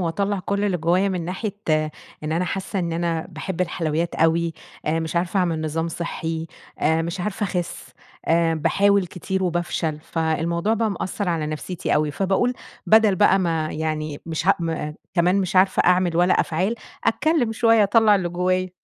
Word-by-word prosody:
وأطلع 200 +4 -1
كل 200 +2 -1
اللي 195 -3 +1
جوّايا 175 +4 +2
مِن 180 -3 -2
ناحية 195 +3 -4 0.7
إن 155 - -2
أنا 170 +3 +1
حاسّة 195 +2 -3
إن 170 -2 -1
أنا 165 -1 -1
باحب 180 +2 -5
الحلويّات 165 -1 -1
أوي، 165 0 +2 0.3
آآ 160 +2 +1
مش 160 +1 -4
عارفة 175 +3 0
أعمل 165 -3 0
نظام 160 +1 -2
صحّي، 165 -1 -4 0.3
آآ 160 +1 +2
مش 170 +3 -4
عارفة 210 +3 -2
أخس، 180 -3 -4 0.4
آآ 165 0 +3
باحاول 195 +5 +2
كتير 190 +2 -3
وبافشل، 170 -3 -1
فالموضوع 170 +5 0
بقى 225 -1 0
مأثر 195 0 -3
على 160 -3 -1
نفسيتي 155 +3 -3
أوي. 150 0 +1
فباقول، 195 - +1 0.3
بدل 220 -2 +5
بقى 195 +2 +5
ما 165 -4 -1
يعني 155 -1 -3
مش 165 +1 -3
ه 195 - +7
م 160 -2 -2 0.2
كمان 180 +1 +3
مش 185 -1 -2
عارفة 190 +1 +4
أعمل 180 -1 +3
ولا 175 +1 +4
أفعال، 185 +7 0 0.3
أتكلّم 295 -3 +2
شويّة 225 -1 +4
أطلع 210 +1 +5
اللي 185 -3 0
جوّايا. 185 +1 0
175 Hz, 170 wpm, -23 LUFS, 165-195 Hz, 0.7 s, ه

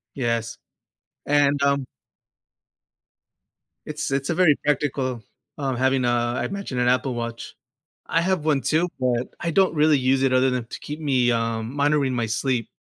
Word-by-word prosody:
Yes. 115 -3 -2 0.7
And, 145 -1 +2
um 140 -1 +2 2.0
It's 150 -2 -4
it's 135 +2 -1
a 170 - 0
very 175 -5 +5
practical 135 -4 -1 0.4
um, 135 -3 -2
having 130 0 +1
a, - - +2 0.3
I - - -1
imagine, 200 -11 -4
an 125 - +2
Apple 130 +1 +1
Watch. 115 -1 -6 0.5
I 165 - +1
have 185 -2 0
one 145 -3 +2
too, 160 +6 +1
but, 125 -1 -1
I 170 - -2
don't 190 -1 +3
really 150 -1 +4
use 130 +1 +1
it 130 -1 +2
other 130 +1 +4
than 125 -2 -2
to - - -8
keep 150 +1 -7
me, 130 -5 +2
um 115 +1 -2
monitoring 145 -2 +1
my 120 - 0
sleep. 115 +1 -1
135 Hz, 165 wpm, -23 LUFS, 125-150 Hz, 2.0 s, very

